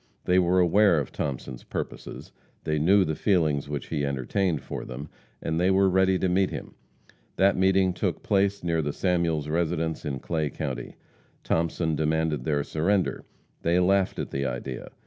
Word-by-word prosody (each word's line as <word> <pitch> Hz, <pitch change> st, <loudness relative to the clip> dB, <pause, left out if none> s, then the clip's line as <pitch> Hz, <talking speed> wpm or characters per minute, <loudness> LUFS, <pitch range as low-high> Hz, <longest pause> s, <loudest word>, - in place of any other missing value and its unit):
They 90 Hz, +1 st, +4 dB
were 90 Hz, +1 st, +2 dB
aware 90 Hz, 0 st, +4 dB
of 70 Hz, -, -4 dB
Thomason's 65 Hz, -3 st, -4 dB
purposes, -, -, -6 dB, 0.3 s
they 75 Hz, -1 st, 0 dB
knew 95 Hz, +5 st, +4 dB
the 80 Hz, -, -1 dB
feelings 80 Hz, -5 st, +1 dB
which 75 Hz, -3 st, -4 dB
he 75 Hz, -3 st, -1 dB
entertained 70 Hz, +4 st, -1 dB
for -, -, -5 dB
them, 70 Hz, +4 st, -7 dB, 0.3 s
and 80 Hz, +1 st, -1 dB
they 90 Hz, +2 st, +3 dB
were 95 Hz, 0 st, +4 dB
ready 95 Hz, 0 st, +3 dB
to 95 Hz, -, 0 dB
meet 95 Hz, +1 st, +2 dB
him. -, -, -7 dB, 0.6 s
That 100 Hz, +1 st, +4 dB
meeting 95 Hz, 0 st, +3 dB
took 90 Hz, -, -2 dB
place 100 Hz, 0 st, +1 dB
near 85 Hz, -2 st, +1 dB
the 75 Hz, -1 st, -2 dB
Samuels 85 Hz, -5 st, 0 dB
residence 80 Hz, 0 st, -1 dB
in 70 Hz, -4 st, -3 dB
Clay 80 Hz, +2 st, -2 dB
county. 65 Hz, -5 st, -5 dB, 0.5 s
Thomason 80 Hz, -1 st, 0 dB
demanded 80 Hz, -3 st, 0 dB
their 75 Hz, -2 st, +1 dB
surrender. 90 Hz, +6 st, 0 dB, 0.4 s
They 85 Hz, +2 st, +2 dB
laughed 95 Hz, +1 st, +2 dB
at -, -, -4 dB
the 70 Hz, -, -2 dB
idea. 65 Hz, 0 st, -4 dB
80 Hz, 165 wpm, -26 LUFS, 75-95 Hz, 0.6 s, They